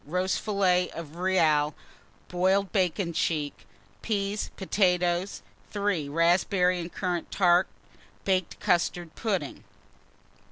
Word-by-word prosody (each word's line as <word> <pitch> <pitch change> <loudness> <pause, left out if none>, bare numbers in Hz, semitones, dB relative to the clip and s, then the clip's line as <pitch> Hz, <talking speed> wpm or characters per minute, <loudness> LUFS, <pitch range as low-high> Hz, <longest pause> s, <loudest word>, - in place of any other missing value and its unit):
Roast 180 +4 -1
fillet 185 -4 +2
of 160 -1 -8
real, 155 -5 +2 0.5
boiled 190 +1 +1
bacon 180 -2 0
cheek, 150 -3 -2 0.3
peas, 205 -1 -2
potatoes. 180 -1 0 0.3
3. 200 -8 -1
Raspberry 180 +3 +2
and 170 0 -6
currant 180 -3 -3
tart, 180 -1 +3 0.6
baked 185 -3 0
custard 175 -3 0
pudding. 195 -11 -3
180 Hz, 95 wpm, -27 LUFS, 170-195 Hz, 0.6 s, tart